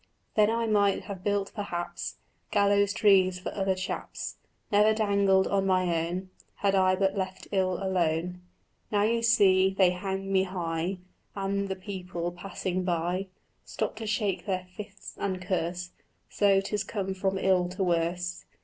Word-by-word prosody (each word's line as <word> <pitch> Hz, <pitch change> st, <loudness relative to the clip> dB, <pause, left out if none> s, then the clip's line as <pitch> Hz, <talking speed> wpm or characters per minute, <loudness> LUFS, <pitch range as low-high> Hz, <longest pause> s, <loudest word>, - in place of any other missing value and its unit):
"Then 210 Hz, 0 st, +4 dB
I 230 Hz, +1 st, 0 dB
might 205 Hz, -3 st, +2 dB
have 190 Hz, -2 st, -7 dB
built 205 Hz, -1 st, 0 dB
perhaps 175 Hz, -5 st, -4 dB, 0.3 s
Gallows 200 Hz, 0 st, +3 dB
trees 190 Hz, -3 st, +4 dB
for 180 Hz, -, -5 dB
other 195 Hz, -1 st, 0 dB
chaps, 185 Hz, +2 st, -5 dB, 0.3 s
Never 210 Hz, +1 st, +5 dB
dangled 200 Hz, -3 st, +3 dB
on 195 Hz, -1 st, +1 dB
my 180 Hz, -3 st, +2 dB
own, 185 Hz, +2 st, -5 dB, 0.2 s
Had 200 Hz, -1 st, +1 dB
I 185 Hz, -1 st, +4 dB
but 195 Hz, +1 st, +1 dB
left 190 Hz, -1 st, -4 dB
ill 190 Hz, -2 st, +2 dB
alone." 180 Hz, -1 st, -1 dB, 0.5 s
"Now, 205 Hz, -1 st, +3 dB
you 230 Hz, +2 st, +2 dB
see, 195 Hz, -5 st, +4 dB
they 185 Hz, -2 st, +5 dB
hang 195 Hz, +1 st, -3 dB
me 190 Hz, -1 st, +4 dB
high, 175 Hz, 0 st, -2 dB, 0.4 s
And 200 Hz, 0 st, -1 dB
the 190 Hz, -, -1 dB
people 180 Hz, -3 st, -5 dB
passing 185 Hz, 0 st, -3 dB
by 180 Hz, +2 st, -1 dB, 0.4 s
Stop -, -, -3 dB
to 220 Hz, -1 st, -5 dB
shake 205 Hz, -4 st, -1 dB
their 185 Hz, -2 st, -1 dB
fists 200 Hz, -1 st, -9 dB
and 190 Hz, -2 st, -1 dB
curse; 180 Hz, -1 st, -2 dB, 0.4 s
So 195 Hz, -1 st, +4 dB
'tis 205 Hz, +1 st, -2 dB
come 195 Hz, -3 st, -3 dB
from 190 Hz, 0 st, -1 dB
ill 185 Hz, -2 st, +2 dB
to 185 Hz, +2 st, -2 dB
worse." 175 Hz, +1 st, -1 dB
190 Hz, 155 wpm, -28 LUFS, 180-200 Hz, 0.5 s, Never